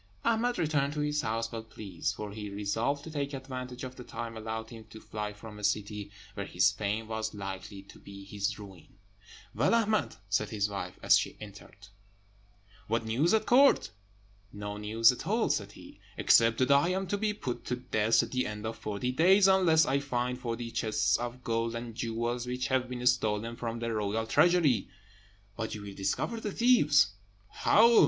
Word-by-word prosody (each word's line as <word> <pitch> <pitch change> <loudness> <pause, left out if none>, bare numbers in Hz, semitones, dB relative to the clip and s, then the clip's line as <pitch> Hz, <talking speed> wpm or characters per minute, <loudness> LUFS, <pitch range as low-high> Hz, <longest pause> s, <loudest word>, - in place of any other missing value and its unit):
Ahmed 235 +2 +1
returned 145 -2 +1
to 150 - -2
his 150 0 0
house 115 +1 -2
well 115 -1 -4
pleased; 105 -5 -5
for 105 -1 -6
he 105 0 -6
resolved 110 +8 -1
to 160 - -8
take 140 -2 -3
advantage 130 -1 -7
of 130 0 -7
the 125 - -8
time 115 -1 -6
allowed 110 +1 -5
him 115 -1 -10
to 110 0 -12
fly 105 -1 -5
from 105 0 -11
a - - -10
city 105 0 -1 0.2
where - - -5
his - - +3
fame 105 +2 -3
was 110 -1 -3
likely 95 0 -7
to 100 - -15
be 100 0 -11
his 100 0 -2
ruin. 95 -3 -13 0.6
"Well, 140 - +2
Ahmed," 220 -2 +1
said 100 +1 0
his 105 -1 0
wife, 100 -3 -6
as - - +6
he - - -5
entered, 100 -1 -12 1.0
"what 115 +1 0
news 130 +10 +2
at 220 -1 +1
Court?" 275 +3 +5 0.6
"No 105 0 -6
news 110 +2 +4
at - - -7
all," - - +2
said - - -2
he, - - -14 0.2
"except 115 0 +5
that 130 +2 +2
I 140 +5 +5
am 190 +1 -1
to 205 +3 -1
be 215 0 +1
put 130 - -5
to 125 - -1
death 115 -3 +2
at - - -7
the 125 -1 0
end 105 0 -6
of 110 - -5
forty 105 +4 -2
days, 190 +8 +5
unless 180 -5 +5
I 135 +1 +1
find 125 -2 -2
forty 115 -1 -4
chests 110 -2 +1
of 120 +1 -6
gold 115 0 -1
and 115 0 -5
jewels 120 +2 -2
which 125 +1 -2
have 130 -1 +1
been 125 -1 -5
stolen 110 -1 +1
from 115 -1 -4
the 115 0 -3
royal 110 +1 -1
treasury." 160 - +3 0.7
"But 110 -1 -4
you 105 - -8
will 100 -1 -8
discover 100 - -2
the 210 -2 -4
thieves." 150 - +4 0.4
"How? 230 +2 +5
115 Hz, 190 wpm, -30 LUFS, 105-140 Hz, 1.0 s, as